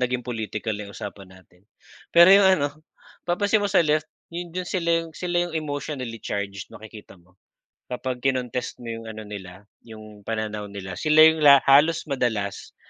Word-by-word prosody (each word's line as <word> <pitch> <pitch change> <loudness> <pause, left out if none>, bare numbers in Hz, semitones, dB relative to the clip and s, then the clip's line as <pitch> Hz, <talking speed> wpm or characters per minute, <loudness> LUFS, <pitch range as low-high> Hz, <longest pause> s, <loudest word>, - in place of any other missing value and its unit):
naging 125 -1 -1
political 110 -2 -4
na 105 -1 -6
yung 100 - -12
usapan 100 -2 -8
natin. 95 -1 -20 0.5
Pero 170 +1 +7
yung 200 -1 +7
ano, 145 -2 0 0.6
papansin 205 +4 +2
mo 205 - 0
sa 190 -4 +3
left, 155 0 0 0.2
yun 175 0 -5
dun 180 +2 -5
sila 175 -1 -2 0.2
yung, 165 - -11
sila 175 +1 -3
yung 175 - -7
emotionally 145 -6 -4
charged 100 -3 -5
makikita 105 -3 -13
mo. 90 +1 -28 0.5
Kapag 125 0 -4
kinontest 125 -2 -2
mo 115 - -4
yung 115 0 -8
ano 110 -1 -8
nila, 100 -2 -10 0.2
yung 110 -1 -12
pananaw 105 -1 -4
nila, 95 -3 -7
sila 155 0 +6
yung 160 0 +5
la 140 -2 +7
halos 150 +4 +4
madalas, 110 -8 -3
125 Hz, 170 wpm, -24 LUFS, 105-155 Hz, 0.6 s, Pero